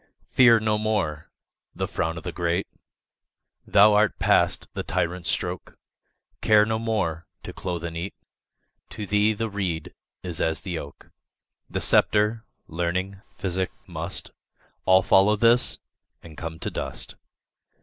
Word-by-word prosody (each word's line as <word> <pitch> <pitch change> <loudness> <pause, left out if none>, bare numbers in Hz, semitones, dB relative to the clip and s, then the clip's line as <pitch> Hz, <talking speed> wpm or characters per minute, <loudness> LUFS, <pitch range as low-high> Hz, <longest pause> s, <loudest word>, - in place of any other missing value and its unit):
Fear 120 -3 +5
no 110 -1 +1
more 100 -9 -1 0.5
the - - -2
frown 80 0 -2
o' - - -6
the - - -5
great, 85 +2 -1 1.0
Thou 105 +1 +6
art 105 0 +3
past - - +2
the - - -3
tyrant's 85 0 -2
stroke; - - -3 0.6
Care 105 -1 +5
no 110 0 -1
more 95 -8 -2 0.2
to - - -7
clothe, 90 -3 -4
and 85 -1 -5
eat; 90 +4 -5 0.7
To 105 - -6
thee 105 +2 +2
the 115 +2 -2
reed 95 -7 -3 0.3
is 90 -3 -4
as 80 0 0
the 90 -4 -4
oak: 70 - -11 0.6
The - - -3
sceptre, 105 +2 +3 0.2
learning, 90 +3 -2 0.2
physic, 95 -1 -1 0.2
must 85 +1 -5 0.5
All 95 0 +5
follow 100 +4 +5
this 115 +3 +3 0.5
and 80 -2 -12
come 80 +1 -6
to - - -3
dust. - - -5
95 Hz, 140 wpm, -25 LUFS, 85-105 Hz, 1.0 s, Thou